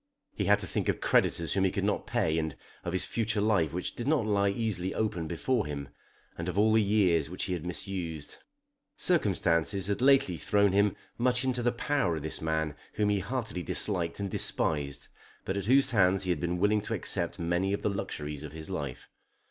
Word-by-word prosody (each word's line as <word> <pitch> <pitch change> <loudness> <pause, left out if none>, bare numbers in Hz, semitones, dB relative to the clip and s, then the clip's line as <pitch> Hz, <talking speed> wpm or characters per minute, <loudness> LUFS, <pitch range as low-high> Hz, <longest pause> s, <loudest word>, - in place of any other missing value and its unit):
He - - -2
had - - +5
to - - -5
think - - -1
of - - 0
creditors 85 -1 +2
whom 95 - +2
he 95 - +4
could - - -2
not - - -1
pay, 80 0 +1
and 80 -2 -3 0.3
of 85 - -3
his 95 - 0
future 110 -2 -1
life 100 -8 +2
which 90 +2 -3
did 120 - -5
not 145 -7 +2
lie 100 -2 +2
easily 100 -3 -2
open 90 -7 -1
before 85 - 0
him, 70 -2 -5 0.5
and 85 +1 -4
of 90 - -4
all 110 +1 +4
the 110 - +5
years 95 -7 +2
which 90 - -4
he 95 - -2
had 85 -3 -4
misused. 85 -4 -3 0.6
Circumstances 95 - +1
had 100 +3 -1
lately 130 -10 +4
thrown 100 +2 +2
him 100 0 +3 0.2
much 125 +1 +2
into 130 -2 +1
the 120 0 +2
power 120 - 0
of 75 - -5
this 80 - -3
man 80 -1 -1 0.2
whom 105 -1 +1
he 100 -1 +2
heartily 110 -2 -3
disliked 85 +1 0
and 100 -1 -3
despised, 70 -3 -1 0.4
but 95 - -2
at 100 -1 -2
whose 130 +3 +4
hands 95 -3 +3
he 90 - 0
had 85 - 0
been 85 +2 -1
willing 105 +3 +2
to - - -3
accept - - -2
many 85 +3 0
of 100 - -2
the - - +2
luxuries 75 -7 -4
of - - -8
his 80 +3 -8
life. 70 -8 -5
95 Hz, 210 wpm, -29 LUFS, 85-105 Hz, 0.6 s, had